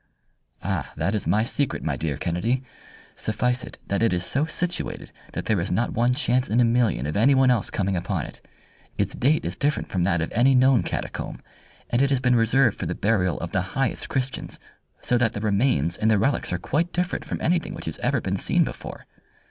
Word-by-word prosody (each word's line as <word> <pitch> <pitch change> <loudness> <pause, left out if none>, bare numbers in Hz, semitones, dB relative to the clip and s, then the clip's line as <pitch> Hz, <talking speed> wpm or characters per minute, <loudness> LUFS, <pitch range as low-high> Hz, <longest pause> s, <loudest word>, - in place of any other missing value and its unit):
"Ah, 95 -5 -2
that 100 - 0
is 105 - -1
my 105 +5 +3
secret, 135 +3 -1
my - - -1
dear 75 -4 -2
Kennedy! 90 - -1 0.5
Suffice 125 +3 0
it - - -9
that 100 - -1
it 115 -4 +3
is 90 0 0
so 140 +3 0
situated 175 +1 -3 0.2
that - - -4
there 105 -4 +1
is 85 +5 -2
not 120 - 0
one 120 +2 +2
chance 125 -2 +1
in 115 - +2
a 120 - +5
million 115 - +2
of 75 - -3
anyone 130 +4 +5
else 115 -5 +1
coming 95 -1 -1
upon 90 -2 -2
it. - - -11 0.6
Its - - 0
date 150 +5 +1
is - - -2
different 145 0 -1
from 90 - -1
that 90 -2 +2
of 80 - -2
any 130 +4 +4
known 130 -3 +5
catacomb, - - -4 0.5
and 120 - +2
it 140 - +3
has 135 -2 +2
been 125 -1 +2
reserved 115 0 +3
for - - -2
the - - -2
burial 95 -4 +1
of 85 - -4
the 90 - +1 0.2
highest 135 -1 -1
Christians, 130 0 -3 0.4
so 125 - +2
that 115 -2 +2
the - - -4
remains 100 - +1
and 110 - +2
the 110 - +4
relics 135 +3 +1
are 90 - 0
quite 155 - -1
different 180 -3 -1
from 155 - -4
anything 170 0 0
which - - -8
has - - -5
ever - - +1
been - - -2
seen - - +3
before. - - -7
115 Hz, 215 wpm, -24 LUFS, 95-130 Hz, 0.6 s, a